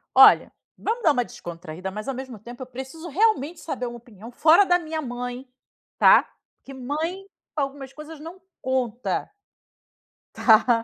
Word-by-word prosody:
Olha, - - +8 0.3
vamos 460 +3 -2
dar 315 - +6
uma 250 -4 +1
descontraída, 170 0 -8
mas 215 +4 -7
ao 270 - -1
mesmo 260 -2 -7
tempo 240 +5 -11
eu 255 - -6
preciso 265 +7 -8
realmente 350 -3 +1
saber 255 -6 -4
uma 240 0 -7
opinião 230 -1 -13
fora 315 +9 +6
da 355 -2 +3
minha 320 -2 -4
mãe, 245 0 -5 0.5
tá? - - +6 0.3
Porque 270 - -12
mãe, 310 +9 -4 0.3
pra 295 - +1
algumas 275 -1 -6
coisas 305 +2 -10
não 330 +4 -10 0.2
conta. 255 - -2 1.0
Tá? 230 0 +5
265 Hz, 155 wpm, -24 LUFS, 240-315 Hz, 1.0 s, Olha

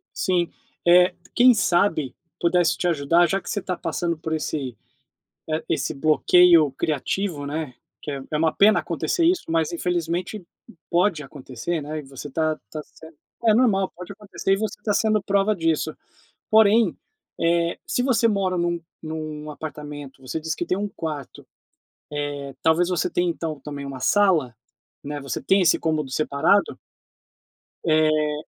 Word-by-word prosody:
Sim, 175 -3 +1 0.4
eh, 180 +1 +6 0.2
quem 250 0 +7
sabe, 175 - +1 0.2
pudesse 170 -1 +2
te 180 - 0
ajudar, 170 +2 +3
já 195 - 0
que - - -9
você 205 - -1
está 180 -1 -3
passando 170 0 -2
por 160 0 -4
esse, 140 -6 -3 0.7
eh, 155 +1 -1
esse 160 - -1
bloqueio 155 +1 +5
criativo, 155 +2 -2
né, 145 -2 -4 0.3
que 150 - -5 0.2
é 150 - 0
uma 160 0 +2
pena 210 +1 +5
acontecer 340 -2 -1
isso, 355 +1 +2
mas 165 -1 +1
infelizmente 175 +3 -2
p 175 - -19 0.4
pode 175 -2 +2
acontecer, 135 +3 -5
né, 155 +2 -5
e - - -6
você 135 +1 -9
está 155 +2 -1
está 155 - -7
sen 160 0 -15 0.3
É 220 - +6
normal, 205 -6 +2
pode 180 +2 -9
acontecer 200 -1 -2
e - - +2
você 210 -1 -4
está 210 0 -1
sendo 215 -1 +2
prova 200 +1 +2
disso. 160 -2 0 0.6
Porém, 220 -2 +5 0.4
eh, 170 0 +1
se 245 - 0
você 235 -3 +3
mora 195 -3 0
num 170 0 0 0.2
num 155 -1 -6
apartamento, 145 -2 -8
você 130 +5 -4
diz 160 0 -3
que 175 - -4
tem 185 - 0
1 205 +1 -2
quarto, 155 -7 -7 0.7
eh, 145 -2 -4
talvez 170 +3 +3
você 175 -3 0
tenha 175 0 +1
então, 160 -3 -4
também, 140 0 -7
1 135 -1 -7
sala, 165 - +2 0.5
né, 145 0 -5
você 135 -3 -4
tem 195 0 +3
esse 170 - +4
cômodo 155 -4 -1
separado? 155 +7 +1 1.1
Eh. 155 -1 +2
165 Hz, 155 wpm, -23 LUFS, 150-190 Hz, 1.1 s, quem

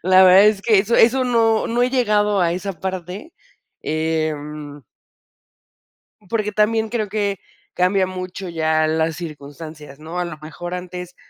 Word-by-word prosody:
la 185 +1 +6
verdad 185 +2 +8
es 210 -2 +2
que 215 -4 +4
eso 215 +4 +1
eso 255 +3 +4
no 225 -2 +2
no 240 +1 0
he 250 - +2
llegado 210 -5 +2
a 170 -1 +2
esa 190 +3 -4
parte, 190 - -5 0.5
em 150 -2 -3 1.5
porque 215 -2 -1
también 220 +1 +1
creo 220 -2 -2
que 200 -2 -1 0.3
cambia 185 +1 +2
mucho 185 0 -6
ya 160 -1 +1
las 160 0 0
circunstancias, 150 -2 -9
¿no?, 165 +3 -6
a 180 - -1
lo 165 -3 -7
mejor 175 +3 -7
antes 180 0 -7
185 Hz, 150 wpm, -20 LUFS, 160-210 Hz, 1.5 s, verdad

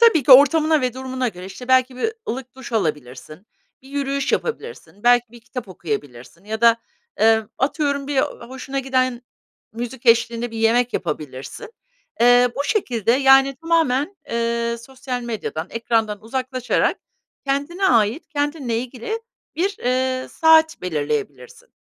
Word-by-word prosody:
Tabii 450 -10 +6
ki 265 - +6
ortamına 305 +3 +6
ve 250 -2 -1
durumuna 260 -1 -3
göre, 180 -4 -9
işte, 195 +7 -10
belki 255 0 +3
bir 445 - -1 0.2
ılık 250 +1 -5
duş 260 -2 -10
alabilirsin, 155 - -4 0.4
bir 265 - -16
yürüyüş 275 -1 -2
yapabilirsin, 465 - -4
belki 245 -1 +3
bir 240 - -13
kitap 240 -2 -8
okuyabilirsin 145 - -6
ya 220 +1 -4
da, 230 -1 +6 0.4
eee, 220 0 +5 0.2
atıyorum, 280 0 0
bir, 290 - -3
eee, 265 - +4 0.3
hoşuna 265 +1 -5
giden 255 -2 0 0.5
müzik 240 +2 -7
eşliğinde 230 +1 +3
bir 225 - -7
yemek 235 +2 +2
yapabilirsin. 150 - -5 0.5
Eee, 245 +1 +6
bu 280 - -1
şekilde, 240 - 0
yani, 270 0 +5
tamamen, 325 +1 0
eee, 235 0 -1
sosyal 255 +1 -6
medyadan, 215 -8 -4
ekrandan 225 -3 -1
uzaklaşarak 255 +2 -1 0.5
kendine 285 +8 -1
ait, 230 +5 +2
kendinle 290 -5 -2
ilgili 255 - -5 0.4
bir, 385 +3 0
eee, 255 +1 -1
saat 320 0 +4
belirleyebilirsin. 145 -6 -4
250 Hz, 140 wpm, -21 LUFS, 225-275 Hz, 0.5 s, Tabii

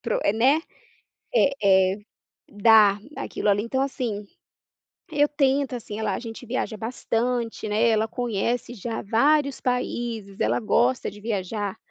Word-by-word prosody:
pro 230 - -1
eh, 200 - +3
né. 255 +7 +4 0.8
É 195 - +3
é, - - -7 0.5
dar 210 -1 +5 0.2
aquilo - - -3
ali. 205 +1 +2
Então 260 +3 -1
assim, 245 -7 -3 0.9
eu 295 -2 +3
tento, 280 -1 +1
assim 220 -3 -6
ah - - -2
lá, 215 - 0
a - - -4
gente 230 +1 -8
viaja 240 -1 -2
bastante, 235 +1 -2
né, 215 +3 +2
ela 220 -1 +2
conhece 240 0 -2
já 225 0 -5
vários 280 +6 +2
países, 235 -5 -3
ela 115 +3 +2
gosta 125 +2 +1
de 205 - -13
viajar. 205 -1 -3
225 Hz, 145 wpm, -24 LUFS, 205-250 Hz, 0.9 s, dar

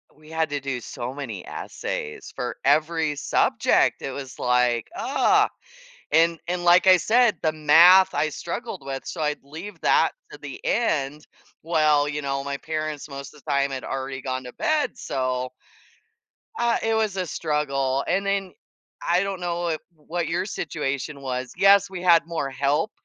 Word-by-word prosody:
we 155 +1 -18
had 160 0 -1
to 145 - -1
do 135 -2 -3
so 120 +1 -6
many 120 -10 -6
essays 75 - -5
for 125 - -4
every 155 +1 +2
subject, - - +2
it 135 - -3
was 135 -1 -8
like, 125 -1 +2
oh, - - +3 0.6
and 165 +1 +4
and, 180 0 -2
like 175 +2 +6
I 185 - +8
said, 225 +2 +3
the 155 - +2
math 170 +5 +7
I 150 +2 +1
struggled 170 - -6
with, 135 -1 -5
so, - - -5
I'd 150 -1 -1
leave 165 +9 -9
that - - +4 0.2
to - - -9
the - - -8
end. 150 - 0 0.4
Well, 155 -3 +3
you 150 0 -3
know, 135 0 -2
my 140 0 -3
parents 155 -1 -4
most 140 0 -8
of 150 - -17
the - - -8
time 140 0 +1
had 130 - -5
already 135 0 -4
gone 130 0 -3
to 125 - -9
bed, 310 -1 0
so 130 -1 -2 1.1
uh, 235 -1 +2
it 225 0 +1
was 215 -3 0
a 185 - -1
struggle, 140 -4 -1
and 195 +3 +1
then, 195 -2 -1 0.5
I 175 +3 +3
don't 195 -2 -4
know, 175 -1 -1 0.2
wh 150 - -29
what 175 -1 -1
your 175 +3 -1
situation 140 - -4
was, 130 -1 -4
yes, 200 0 +6
we 190 -2 -6
had 170 -2 +5
more 160 -5 -2
help 145 +9 0
150 Hz, 170 wpm, -24 LUFS, 135-175 Hz, 1.1 s, I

